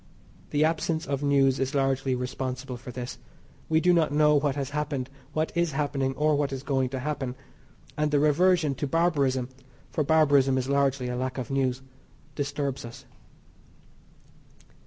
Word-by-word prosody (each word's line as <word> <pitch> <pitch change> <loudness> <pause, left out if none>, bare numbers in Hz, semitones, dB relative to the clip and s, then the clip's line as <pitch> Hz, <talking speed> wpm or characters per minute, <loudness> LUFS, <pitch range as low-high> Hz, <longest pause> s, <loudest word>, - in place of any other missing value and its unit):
The 150 +1 +2
absence 160 0 -1
of 140 0 -2
news 135 -2 +3
is 135 +2 -1
largely 135 -1 +1
responsible 130 +1 -4
for 125 +1 -9
this. 120 0 -6 0.5
We 160 0 +4
do 180 +2 +4
not 165 -4 +3
know 150 0 +4
what 145 -1 +2
has 140 -1 -3
happened, 145 -3 -3 0.2
what 155 +1 0
is 170 -3 0
happening, 135 -2 -1
or 150 +2 +2
what 145 -1 0
is 135 -1 -5
going 135 -3 0
to 130 0 -4
happen, 135 -3 -3 0.6
and 150 0 +1
the 145 -1 +2
reversion 155 +1 +3
to 145 - 0
barbarism 140 -6 +1 0.4
(for 155 - 0
barbarism 140 -3 +4
is 130 0 -1
largely 140 -2 +1
a 125 - -3
lack 130 +1 -3
of 130 -1 -4
news) 130 -1 0 0.5
disturbs 140 -1 -3
us. 120 0 -10
140 Hz, 160 wpm, -27 LUFS, 130-150 Hz, 0.6 s, We